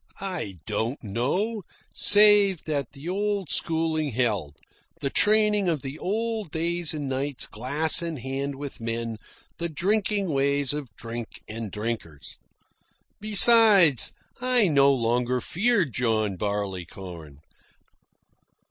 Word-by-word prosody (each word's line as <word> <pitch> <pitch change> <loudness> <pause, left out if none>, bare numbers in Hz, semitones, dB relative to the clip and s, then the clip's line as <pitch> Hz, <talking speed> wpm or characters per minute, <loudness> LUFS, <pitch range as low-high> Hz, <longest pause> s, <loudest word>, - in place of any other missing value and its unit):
I 180 - -5
don't 110 +6 -3
know, 145 - -2 0.3
save 205 -3 +5
that 145 -5 -3
the 145 +3 -10
old 200 -3 -2
schooling 160 +1 0
held, 105 - -2 0.4
the 140 -3 -3
training 210 -2 +3
of 155 -5 -2
the 135 +3 -7
old 220 0 -2
days 170 +1 -2
and 150 -3 -4
nights 135 +1 -2
glass 145 +10 +3
in 165 -2 -4
hand 135 +2 -4
with 140 -3 -8
men, 115 0 -4 0.4
the 170 0 -1
drinking 200 +3 0
ways 140 -1 0
of 145 -4 -6
drink 115 0 -8
and 110 0 -6
drinkers. 105 -10 -6 0.8
Besides, 210 - +5 0.3
I 250 -4 +3
no 140 -2 +4
longer 125 0 0
feared 185 - 0
John 110 -4 0
Barleycorn. 90 -6 -6
140 Hz, 115 wpm, -25 LUFS, 115-190 Hz, 0.8 s, save